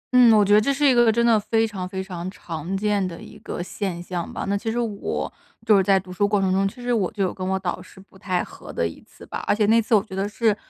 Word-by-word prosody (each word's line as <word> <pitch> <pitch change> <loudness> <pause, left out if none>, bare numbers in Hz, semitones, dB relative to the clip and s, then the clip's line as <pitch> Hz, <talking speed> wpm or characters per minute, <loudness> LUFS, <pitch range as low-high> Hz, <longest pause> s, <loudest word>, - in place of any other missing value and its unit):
嗯， 245 -2 +8
我 205 - +5
觉 205 - +3
得 210 - +7
这 275 - +1
是 285 +2 +1
一 265 - +5
个 240 -2 +5
真 235 +2 +1
的 230 -2 +5
非 225 +2 +1
常 190 -4 -5
非 190 0 -4
常 180 -2 -6
常 175 -1 -5
见 205 -1 +1
的 170 -2 -8
一 - - -12
个 - - -5
现 180 -2 -4
象 175 -1 -4
吧。 - - -4
那 200 - +1
其 225 +3 -2
实 230 - -3
我， 225 -4 -3 0.3
就 215 -2 +6
是 195 - +5
在 195 0 +4
读 185 -1 -10
书 205 +3 +1
过 205 0 +1
程 190 -1 +1
中， 195 +1 +2
其 195 - -8
实 245 0 0
我 205 -6 0
就 205 -2 -2
有 185 - -1
跟 185 - -5
我 190 0 +1
导 185 -1 -3
师 185 - -15
不 195 0 -19
太 185 -3 -1
合 - - -11
的 85 - 0
一 85 - -10
次 - - -16
吧。 - - -6
而 - - +3
且 210 0 +2
那 225 +2 +4
次 225 +1 +2
我 200 - +3
觉 195 -4 -9
得 195 +1 -1
是， 220 0 +1
200 Hz, 325 characters per minute, -23 LUFS, 185-220 Hz, 0.3 s, 嗯